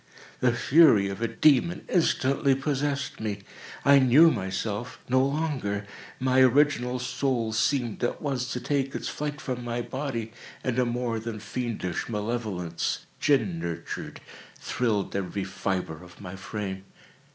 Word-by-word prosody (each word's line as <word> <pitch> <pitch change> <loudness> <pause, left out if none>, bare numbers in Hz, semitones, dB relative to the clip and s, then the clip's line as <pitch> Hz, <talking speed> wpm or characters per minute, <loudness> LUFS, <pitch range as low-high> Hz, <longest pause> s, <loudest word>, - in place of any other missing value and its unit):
The 125 - +3
fury 120 -5 +5
of 100 +3 -6
a 115 - +2
demon 140 +7 +3
instantly 140 -5 +2
possessed 140 0 -2
me. 105 -2 -4 0.4
I 140 0 +8
knew 140 +6 +7
myself 100 +3 -3
no 130 +1 +3
longer. 135 -9 -1 0.3
My 130 0 +3
original 130 -1 +3
soul 125 -2 -1
seemed, 120 0 0
at 120 - 0
once, 135 -3 -2
to 125 - -2
take 135 0 -1
its - - -3
flight 150 0 -4
from 125 -5 -4
my 120 0 -2
body 125 -5 -4 0.3
and 130 -1 0
a 125 - +3
more 120 -1 -1
than 110 -1 -5
fiendish 110 -3 -3
malevolence, 105 -6 -2
gin 165 +4 +2
nurtured, 85 - -5 0.4
thrilled 110 -6 -1
every 100 0 -2
fibre 95 -3 -3
of 90 -1 -15
my 95 -1 -7
frame. 95 -1 -5
120 Hz, 140 wpm, -27 LUFS, 105-135 Hz, 0.4 s, I